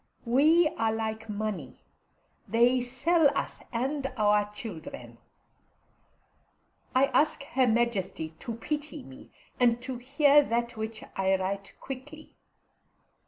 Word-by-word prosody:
We 305 Hz, +8 st, +5 dB
are 225 Hz, -1 st, +2 dB
like 220 Hz, 0 st, -4 dB
money; 205 Hz, -10 st, -4 dB, 0.6 s
they 240 Hz, +3 st, +3 dB
sell 290 Hz, +6 st, +3 dB
us -, -, -3 dB
and 270 Hz, +3 st, -2 dB
our 210 Hz, -1 st, +3 dB
children. 215 Hz, -, -8 dB, 1.8 s
I 260 Hz, +1 st, +6 dB
ask 300 Hz, -1 st, +2 dB
Her 265 Hz, -3 st, +1 dB
Majesty 220 Hz, -8 st, 0 dB
to 230 Hz, -, -5 dB
pity 295 Hz, +5 st, -4 dB
me, 130 Hz, 0 st, -13 dB, 0.3 s
and 240 Hz, -1 st, +4 dB
to 255 Hz, -1 st, -4 dB
hear 285 Hz, +3 st, +5 dB
that 235 Hz, -3 st, -1 dB
which 220 Hz, 0 st, -5 dB
I 190 Hz, 0 st, +2 dB
write 195 Hz, +1 st, -4 dB
quickly. 290 Hz, +4 st, -9 dB
235 Hz, 115 wpm, -28 LUFS, 215-275 Hz, 1.8 s, I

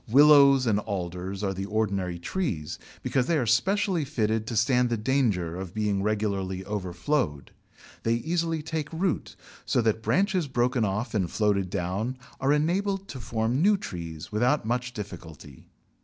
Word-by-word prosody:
Willows 140 Hz, 0 st, +7 dB
and 105 Hz, -3 st, +2 dB
Alders 95 Hz, -1 st, -4 dB
are 95 Hz, -1 st, 0 dB
the 95 Hz, +1 st, -4 dB
ordinary 100 Hz, -4 st, -1 dB
trees, 85 Hz, -, -3 dB, 0.2 s
because 130 Hz, -1 st, +1 dB
they 170 Hz, -, +2 dB
are 130 Hz, -, +1 dB
specially 185 Hz, -, +2 dB
fitted 110 Hz, -6 st, -1 dB
to 115 Hz, -, -3 dB
stand 125 Hz, +3 st, +3 dB
the 120 Hz, -, 0 dB
danger 105 Hz, -9 st, 0 dB
of 95 Hz, 0 st, -7 dB
being 105 Hz, -2 st, 0 dB
regularly 100 Hz, -3 st, -1 dB
overflowed. 90 Hz, -, -2 dB, 0.5 s
They 115 Hz, +1 st, +1 dB
easily 165 Hz, +4 st, -1 dB
take 160 Hz, -1 st, -3 dB
root, 170 Hz, +1 st, -2 dB, 0.3 s
so -, -, +1 dB
that 110 Hz, 0 st, +1 dB
branches 190 Hz, -, +1 dB
broken 125 Hz, -2 st, +1 dB
off 105 Hz, +4 st, -2 dB
and 95 Hz, -6 st, 0 dB
floated 100 Hz, -2 st, +1 dB
down 100 Hz, +7 st, -2 dB, 0.2 s
are 135 Hz, +1 st, +2 dB
enabled 190 Hz, +6 st, +1 dB
to 130 Hz, -, -6 dB
form 115 Hz, +4 st, -1 dB
new 205 Hz, +3 st, +5 dB
trees 85 Hz, -, -7 dB
without 120 Hz, +5 st, +2 dB
much 125 Hz, +2 st, -1 dB
difficulty. 80 Hz, -, -9 dB
110 Hz, 155 wpm, -27 LUFS, 95-140 Hz, 0.5 s, Willows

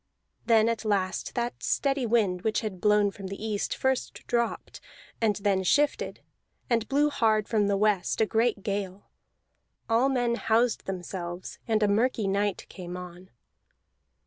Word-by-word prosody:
Then 225 Hz, -1 st, +5 dB
at 230 Hz, -1 st, -1 dB
last 195 Hz, -3 st, -1 dB
that 240 Hz, 0 st, -2 dB
steady 275 Hz, -3 st, 0 dB
wind 205 Hz, -6 st, +2 dB
which 220 Hz, +2 st, 0 dB
had 195 Hz, -5 st, -5 dB
blown 210 Hz, -1 st, +4 dB
from 195 Hz, -1 st, -8 dB
the 195 Hz, +1 st, -6 dB
east 215 Hz, -1 st, -2 dB
first 265 Hz, -1 st, -2 dB
dropped, 235 Hz, -1 st, -2 dB, 0.4 s
and 215 Hz, -2 st, +2 dB
then 200 Hz, -2 st, +1 dB
shifted, 290 Hz, +10 st, +1 dB, 0.5 s
and 230 Hz, -2 st, +2 dB
blew 295 Hz, +2 st, +3 dB
hard 220 Hz, -5 st, +2 dB
from 210 Hz, -3 st, +2 dB
the 200 Hz, -1 st, +1 dB
west, 210 Hz, -2 st, +1 dB
a 220 Hz, -, +4 dB
great 225 Hz, -2 st, +1 dB
gale. 200 Hz, -1 st, -4 dB, 0.8 s
All 230 Hz, +4 st, +3 dB
men 245 Hz, -3 st, +1 dB
housed 230 Hz, +1 st, +1 dB
themselves, 180 Hz, -1 st, -5 dB
and 220 Hz, -2 st, +2 dB
a -, -, +4 dB
murky 220 Hz, +1 st, +1 dB
night 200 Hz, 0 st, 0 dB
came 180 Hz, -1 st, -8 dB
on. 180 Hz, 0 st, -10 dB
215 Hz, 150 wpm, -27 LUFS, 195-235 Hz, 0.8 s, Then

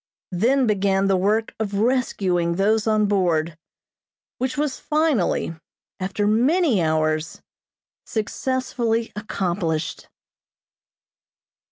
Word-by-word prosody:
Then 250 Hz, +9 st, +2 dB
began 195 Hz, -2 st, +2 dB
the 195 Hz, -1 st, +3 dB
work 210 Hz, +4 st, +1 dB
of 205 Hz, -2 st, -2 dB
rescuing 195 Hz, -7 st, +1 dB
those 210 Hz, +4 st, +2 dB
on 215 Hz, -1 st, +3 dB
board, 170 Hz, -5 st, +1 dB, 0.8 s
which 260 Hz, +3 st, -2 dB
was 290 Hz, -2 st, -1 dB
finally, 300 Hz, -, +1 dB, 0.5 s
after 195 Hz, +2 st, -1 dB
many 250 Hz, -, +3 dB
hours, 155 Hz, 0 st, 0 dB, 0.6 s
successfully 235 Hz, 0 st, -2 dB
accomplished. 175 Hz, -6 st, -2 dB
205 Hz, 85 wpm, -23 LUFS, 180-240 Hz, 0.8 s, the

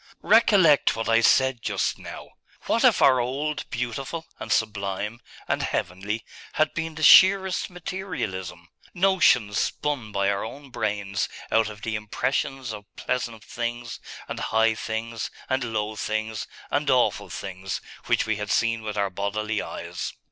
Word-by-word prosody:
Recollect 195 Hz, -7 st, +5 dB
what 115 Hz, 0 st, -3 dB
I 115 Hz, 0 st, +4 dB
said 130 Hz, +1 st, +4 dB
just -, -, -1 dB
now -, -, -9 dB, 0.4 s
what -, -, +1 dB
if -, -, +5 dB
our 130 Hz, -2 st, +6 dB
old 140 Hz, +5 st, -2 dB
Beautiful, 125 Hz, +7 st, -4 dB
and -, -, -6 dB
Sublime, 105 Hz, +1 st, -1 dB, 0.3 s
and -, -, 0 dB
Heavenly, 100 Hz, +5 st, -2 dB, 0.3 s
had 155 Hz, 0 st, +2 dB
been 160 Hz, -1 st, -3 dB
the 155 Hz, -, -5 dB
sheerest 190 Hz, +3 st, +7 dB
materialism, 105 Hz, -, -5 dB, 0.3 s
notions 175 Hz, -, +4 dB
spun 140 Hz, -8 st, -2 dB
by 100 Hz, -1 st, +1 dB
our 100 Hz, 0 st, -2 dB
own 135 Hz, +4 st, -9 dB
brains 105 Hz, -3 st, -2 dB, 0.2 s
out 110 Hz, -1 st, +3 dB
of 105 Hz, 0 st, -11 dB
the 115 Hz, -, -2 dB
impressions 125 Hz, +3 st, -2 dB
of 105 Hz, -1 st, -8 dB
pleasant 115 Hz, -3 st, -3 dB
things, 120 Hz, 0 st, -4 dB, 0.3 s
and -, -, -5 dB
high 110 Hz, 0 st, +2 dB
things, 110 Hz, 0 st, -4 dB, 0.2 s
and 130 Hz, -1 st, 0 dB
low 110 Hz, -2 st, -2 dB
things, 110 Hz, +1 st, -3 dB, 0.2 s
and 145 Hz, 0 st, +1 dB
awful 130 Hz, -2 st, +2 dB
things, 95 Hz, -1 st, -5 dB, 0.3 s
which -, -, +2 dB
we 110 Hz, -1 st, 0 dB
had 105 Hz, -1 st, -4 dB
seen 115 Hz, +1 st, +1 dB
with 105 Hz, -1 st, -5 dB
our 100 Hz, -1 st, 0 dB
bodily 105 Hz, +3 st, -2 dB
eyes? -, -, -5 dB
115 Hz, 150 wpm, -25 LUFS, 105-135 Hz, 0.4 s, sheerest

